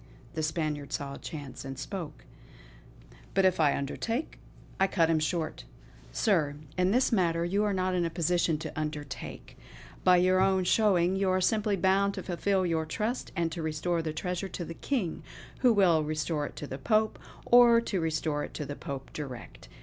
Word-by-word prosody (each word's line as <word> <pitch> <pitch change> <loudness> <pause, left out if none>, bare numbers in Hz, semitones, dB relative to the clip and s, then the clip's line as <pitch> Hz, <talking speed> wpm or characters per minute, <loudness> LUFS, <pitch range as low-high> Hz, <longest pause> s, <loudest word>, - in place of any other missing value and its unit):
The 160 - -2
Spaniard 155 -2 -2
saw 140 -1 -3
a - - -8
chance, 145 -4 -7
and 135 -1 -6
spoke: 155 0 -6 1.1
"But 195 -1 +4
if 185 -2 +3
I 150 -3 +3
undertake 225 - -3 0.2
" - - -23
I 195 - +4
cut 165 -4 +2
him 160 - +3
short: 155 0 -2 0.5
"Sir, 165 -10 +1 0.2
in 180 0 +2
this 250 +6 +3
matter 170 -5 +2
you 200 +4 +1
are 210 - +1
not 185 -1 0
in 180 -1 +1
a 170 - 0
position 170 -1 +1
to 155 - -6
undertake. 150 -3 -6 0.4
By 180 -1 +6
your 185 +1 +4
own 190 -1 +3
showing, 185 -2 +3
you 195 -1 +1
are 185 0 +2
simply 210 +2 +2
bound 195 +2 +2
to - - -5
fulfill 190 +1 0
your 160 -2 0
trust 225 +8 -2
and 170 -2 0
to 165 - -4
restore 160 +2 -1
the 160 -1 -3
treasure 180 +4 -3
to 175 - -5
the 165 - -6
King, 200 - -2 0.4
who 250 -2 +5
will 180 -7 +4
restore 155 0 -1
it - - -12
to - - -6
the 135 -1 -6
Pope; 215 +8 +1 0.3
or 240 -1 +7
to 195 -6 -2
restore 155 -2 -1
it - - -8
to 150 - -4
the 145 +1 -5
Pope 140 -4 -7
direct." 130 - -8
175 Hz, 190 wpm, -29 LUFS, 155-195 Hz, 1.1 s, or